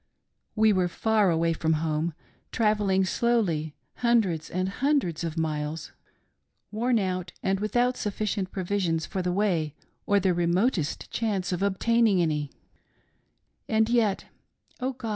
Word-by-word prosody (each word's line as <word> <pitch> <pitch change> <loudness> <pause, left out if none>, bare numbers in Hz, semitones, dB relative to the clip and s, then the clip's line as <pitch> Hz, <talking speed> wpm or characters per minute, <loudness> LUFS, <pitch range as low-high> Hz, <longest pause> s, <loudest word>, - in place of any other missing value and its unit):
We 220 -1 +4
were 185 -2 +2
far 215 +2 +2
away 165 0 +2
from 160 0 0
home, 155 +1 -1 0.4
travelling 210 -4 +2
slowly 185 -9 0 0.2
hundreds 215 -10 +1
and 185 +1 -1
hundreds 245 - 0
of 165 -2 -3
21 160 -2 0
8 - - -2
LEFT 150 - -3
ALONE. - - -2
miles, 160 +1 -7 0.8
worn 235 +3 +1
out 185 -3 -2
and 190 0 +1
without 245 +4 +1
sufficient 205 -2 -2
provisions 180 -4 -1
for 190 - -3
the 180 0 -1
way 175 -6 0 0.3
or 205 0 +4
the 185 -1 +2
remotest 175 - 0
chance 200 -4 -1
of 180 0 -2
obtaining 205 +1 +2
any: 150 -4 0 1.2
And 220 0 +2
yet, 225 -5 +1 0.5
Oh 260 +1 -2
God 240 -3 -6
190 Hz, 145 wpm, -27 LUFS, 170-220 Hz, 1.2 s, We